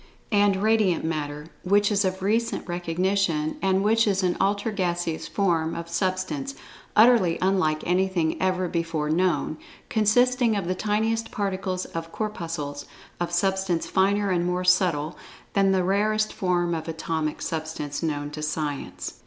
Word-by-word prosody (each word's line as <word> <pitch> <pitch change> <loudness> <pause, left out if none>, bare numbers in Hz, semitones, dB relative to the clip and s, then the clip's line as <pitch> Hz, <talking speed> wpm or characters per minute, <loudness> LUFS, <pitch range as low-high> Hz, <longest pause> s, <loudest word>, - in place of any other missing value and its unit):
and 205 -1 +4
(4) 190 - -3
Radiant 215 -7 +2
Matter, 150 -2 -3 0.2
which 205 +3 +3
is 200 0 +2
of 190 0 -2
recent 225 +2 0
recognition, 175 -2 0
and 190 0 +2
which 225 +1 +3
is 195 -1 +1
an 180 -1 +1
ultra 200 +3 +1
gaseous 175 -4 -2
form 165 -5 0
of 170 0 -5
Substance, 185 - -2 0.4
utterly 220 -7 +5
unlike 185 -5 +1
anything 180 -2 +1
ever 185 -1 +1
before 165 -3 -1
known, 160 -3 +1 0.3
consisting 240 +2 +3
of 195 -4 -2
the 185 - +1
tiniest 220 +3 0
particles 190 -2 -2
of 165 0 -6
"corpuscles" 165 -9 -4 0.3
of 175 0 -2
Substance 190 -1 0
finer 200 +1 +2
and 175 -1 +1
more 180 +1 -1
subtle 175 -4 +2 0.3
than 195 -1 +3
the 190 -1 +2
rarest 215 +3 +1
form 175 -2 0
of 160 0 -4
atomic 160 -1 -2
substance 155 -3 -4
known 145 -3 -2
to 150 0 -6
Science. 150 -2 -4
185 Hz, 145 wpm, -25 LUFS, 165-200 Hz, 0.4 s, utterly